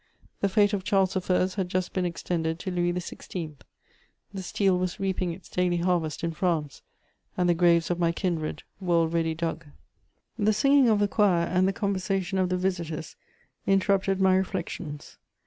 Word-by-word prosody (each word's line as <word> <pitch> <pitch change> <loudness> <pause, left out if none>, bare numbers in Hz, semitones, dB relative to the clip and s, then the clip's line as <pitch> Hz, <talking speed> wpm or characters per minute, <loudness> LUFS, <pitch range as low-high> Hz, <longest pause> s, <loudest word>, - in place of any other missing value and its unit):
The 200 - +1
fate 205 +1 +3
of 195 -2 -1
Charles 195 -1 +2
I. 185 0 +2
had 185 -2 -1
just 185 0 -2
been 185 -1 0
extended 165 -1 -2
to 185 - -5
Louis 175 -1 +1
XVI.; 175 -2 -5 0.8
the 195 - -4
steel 185 0 +1
was 185 +2 -2
reaping 190 -2 -1
its 175 +2 -10
daily 180 -1 0
harvest 170 -3 0
in 170 - 0
France, 160 -4 -1 0.6
and 180 - +2
the 175 - +4
graves 170 0 +3
of 175 - -1
my 170 -1 +2
kindred 170 -3 -2 0.2
were 180 -3 +1
already 165 -1 +1
dug. 165 -1 -3 0.7
The 215 +1 +3
singing 275 +4 +4
of 215 - +4
the 205 0 +2
choir 195 -5 +3
and 185 +2 +2
the - - +2
conversation 195 -1 -1
of 185 -1 +1
the 185 - 0
visitors 170 -4 -3 0.5
interrupted 195 0 +2
my 190 -1 +4
reflections. 180 -5 -4
180 Hz, 170 wpm, -27 LUFS, 170-195 Hz, 0.8 s, the